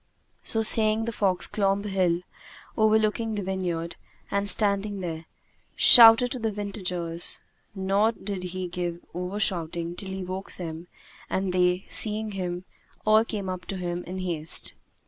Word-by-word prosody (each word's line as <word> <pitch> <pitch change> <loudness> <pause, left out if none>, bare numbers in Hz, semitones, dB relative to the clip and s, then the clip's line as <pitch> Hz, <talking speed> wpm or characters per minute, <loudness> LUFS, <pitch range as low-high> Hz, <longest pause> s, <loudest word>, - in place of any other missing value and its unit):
So 225 0 +1
saying 220 0 +5
the 230 - -3
fox 195 -4 +1
clomb 200 0 -1
a - - -3
hill 180 -3 0 0.5
overlooking 220 0 +1
the 205 - -3
vineyard 180 -3 -3 0.3
and 200 0 +1
standing 200 0 +1
there, 165 -3 -6 0.5
shouted 230 0 +8
out 245 - -6
to 255 - -4
the 225 -1 -2
vintagers; 180 -5 -3 0.4
nor 195 +3 +1
did 200 -4 -6
he 185 0 -5
give 175 -1 -5
over 180 +4 -4
shouting 170 -3 0
till 190 +1 -5
he 190 0 -5
woke 185 +2 -7
them 165 -1 -8 0.4
and 190 -1 -2
they, 180 +1 +1
seeing 215 0 +1
him, 180 -2 -5 0.4
all 215 +1 +5
came 210 -4 -5
up 185 -1 -5
to 195 - -5
him 175 -1 -4
in 185 +2 -7
haste. 170 -4 -1
190 Hz, 155 wpm, -25 LUFS, 180-210 Hz, 0.5 s, shouted